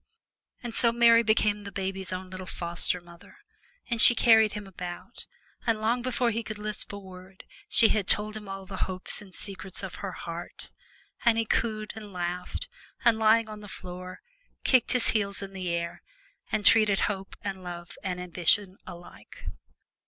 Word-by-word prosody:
And 240 -1 -5
so 235 0 +3
Mary 235 0 +6
became 215 -2 +2
the 200 0 -8
baby's 190 -1 -3
own 185 0 -5
little 185 0 -7
foster 170 +1 -1
mother, 170 0 -16 0.5
and 235 -2 0
she 240 - +10
carried 220 -2 +5
him 210 -1 -6
about, 180 -2 -8 0.4
and 225 -2 +2
long 230 +3 +1
before 245 -1 0
he 230 +1 -2
could 215 -2 -7
lisp 210 0 +2
a 200 - -6
word 185 -1 -12 0.3
she 225 - +7
had 205 -3 0
told 210 +1 +1
him 210 -2 -8
all 195 0 -6
the 190 0 -7
hopes 185 +3 -1
and 200 -2 -13
secrets 195 -1 -5
of 190 - -6
her 195 -2 -4
heart, 170 +1 -7 0.5
and 235 -2 +4
he 230 - +1
cooed 215 -1 -1
and 210 -2 -9
laughed, 180 - -4 0.4
and 230 -2 +5
lying 220 +1 +4
on 215 -1 -9
the 205 - -10
floor, 185 -1 -8 0.4
kicked 255 -2 +4
his 250 -2 +2
heels 200 -2 0
in 195 0 -8
the 185 -2 -4
air 170 0 -3 0.5
and 210 - -1
treated 215 -3 +5
hope 195 -2 -2
and 195 -2 -5
love 175 -1 -8
and 180 -2 -3
ambition 180 +2 +2
alike. 170 -11 -12
200 Hz, 175 wpm, -28 LUFS, 185-220 Hz, 0.5 s, she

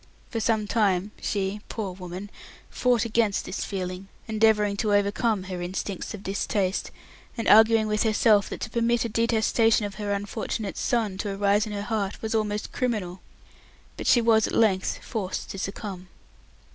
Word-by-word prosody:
For 225 - -2
some 220 -1 +1
time 205 -3 +1
she 200 0 -2
poor 210 -4 -3
woman 185 +2 -8 0.4
fought 245 -3 +2
against 220 -2 +1
this 195 - -4
feeling, 185 -1 -4 0.2
endeavouring 215 -2 +3
to 210 -1 +2
overcome 205 +1 +1
her 185 -1 -5
instincts 190 +3 -4
of 200 - -11
distaste, 195 0 -1 0.5
and 230 - -2
arguing 220 0 +6
with 210 0 0
herself 215 -2 +3
that - - -6
to 220 - -4
permit 235 0 +1
a - - -2
detestation 225 0 +2
of 205 0 -7
her 205 -1 -2
unfortunate 205 +1 -3
son 215 -6 0
to 200 -1 -2
arise 205 +2 +2
in 210 - -5
her 200 0 -3
heart 210 -3 -2
was 220 0 -3
almost 210 -1 -1
criminal; 200 -8 -2 0.7
but - - -5
she 240 - +6
was 225 -2 +4
at - - -6
length 195 -5 +1
forced 200 -6 -4
to 195 - -6
succumb. 190 -2 -5
210 Hz, 165 wpm, -26 LUFS, 195-225 Hz, 0.7 s, arguing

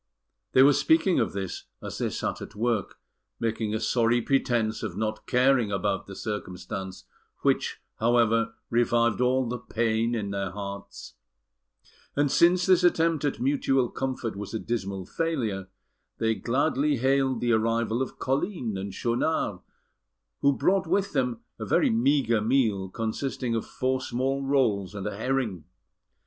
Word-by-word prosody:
They 130 - +7
were 145 +1 +7
speaking 200 - +3
of 115 - 0
this 95 -2 -5
as - - -7
they - - 0
sat - - -3
at - - -9
work, 110 -2 -1 0.4
making 110 -1 -1
a - - -1
sorry 120 +1 +2
pretence 120 -3 0
of 100 -5 -5
not 110 0 -3
caring 125 -3 +3
about 95 0 -1
the 95 - -8
circumstance, 95 -2 -5 0.4
which, - - +1 0.2
however, 115 -1 +2 0.2
revived 115 0 +2
all 130 0 +2
the 125 +1 -3
pain 115 0 0
in 100 -3 -3
their 100 -1 -2
hearts; 100 0 -7 1.0
and 145 -1 +2
since 175 +1 +4
this 185 -2 +4
attempt 165 -3 +3
at 145 - -1
mutual 135 -1 +1
comfort 130 -5 -3
was 105 +2 -6
a - - -1
dismal 100 -5 -3
failure, 115 - -2 0.5
they 110 0 +1
gladly 140 +4 +1
hailed 130 0 +2
the 120 -1 +1
arrival 115 +1 +1
of 130 - -4
Colline 135 - -1
and 95 0 -5
Schaunard, 120 - 0 0.8
who 140 - +4
brought 190 0 +2
with 195 -4 0
them 125 -5 0 0.2
a - - -4
very - - +3
meagre 120 -1 +2
meal, 110 -5 +1
consisting 115 +3 -3
of 115 - -2
four 130 0 -1
small 130 +2 -1
rolls 110 -8 +1
and 100 - -5
a 105 - -3
herring. 110 - -2
115 Hz, 150 wpm, -27 LUFS, 105-135 Hz, 1.0 s, They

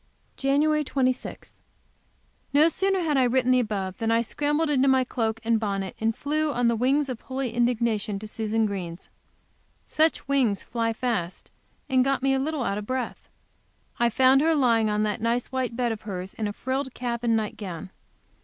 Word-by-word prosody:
JAN. 300 +3 +2
26. 255 -2 -2 1.0
No 300 +3 +6
sooner 385 +3 0
had 305 -4 +1
I 260 - +4
written 255 0 +2
the 255 - +5
above 200 -5 -3
than 225 -1 0
I 230 +1 +3
scrambled 295 +6 0
into 275 -1 +3
my 265 -1 +4
cloak 225 -3 -2
and 225 0 +2
bonnet, 195 -3 -3
and 225 0 0
flew, 305 +1 -1
on 245 -2 +1
the 235 - +2
wings 270 +5 +2
of 255 -4 -5
holy 260 -3 -4
indignation, 235 -4 0
to 215 +2 -7
Susan 220 +1 -1
Green. 180 -5 -4 0.9
Such 315 -2 +1
wings 255 -8 +1
fly 230 -1 -1
fast, 225 -7 -3 0.4
and 260 -2 +3
got 270 0 0
me 270 0 +3
a 265 - +1
little 295 0 -1
out 200 -2 -1
of 210 - -8
breath. 255 -1 -4 0.7
I 235 0 +4
found 260 +3 +5
her 325 +1 +3
lying 230 -6 +3
on 210 0 +1
that 210 -1 -2
nice 235 +2 -1
white 260 -3 -2
bed 240 -1 0
of 220 -1 -5
hers, 190 -3 -6
in 215 - -3
a 205 - -4
frilled 260 +3 -3
cap 240 -1 -3
and 230 -1 +3
night 215 -1 -3
gown. 185 -3 -7
240 Hz, 190 wpm, -26 LUFS, 220-270 Hz, 1.0 s, No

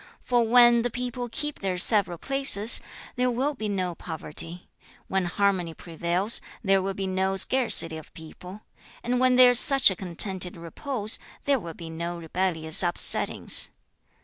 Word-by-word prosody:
For 245 -1 -1
when 240 0 +4
the 245 - -3
people 245 0 -6
keep 295 +1 -5
their 190 -2 -4
several 190 -2 +2
places, 270 -3 +4 0.4
there 250 0 0
will 260 +5 -2
be 220 -6 -6
no 185 -3 -3
poverty; 165 +1 -7 0.4
when 190 -1 -2
harmony 180 -2 -2
prevails, 175 +5 -2 0.2
there 195 -2 +1
will 195 0 -5
be 195 - -5
no 190 0 -2
scarcity 195 -6 +1
of 155 - -14
people; 180 +4 -13 0.4
and 245 +1 -2
when 255 0 +2
there 250 0 +6
is 245 - +3
such 275 -7 +4
a - - -5
contented 180 0 -2
repose, 215 - -3 0.3
there 280 -2 0
will 170 -5 -10
be 165 -1 -11
no 170 +2 -6
rebellious 165 -1 0
upsettings. 175 -2 +4
195 Hz, 155 wpm, -24 LUFS, 175-245 Hz, 0.4 s, there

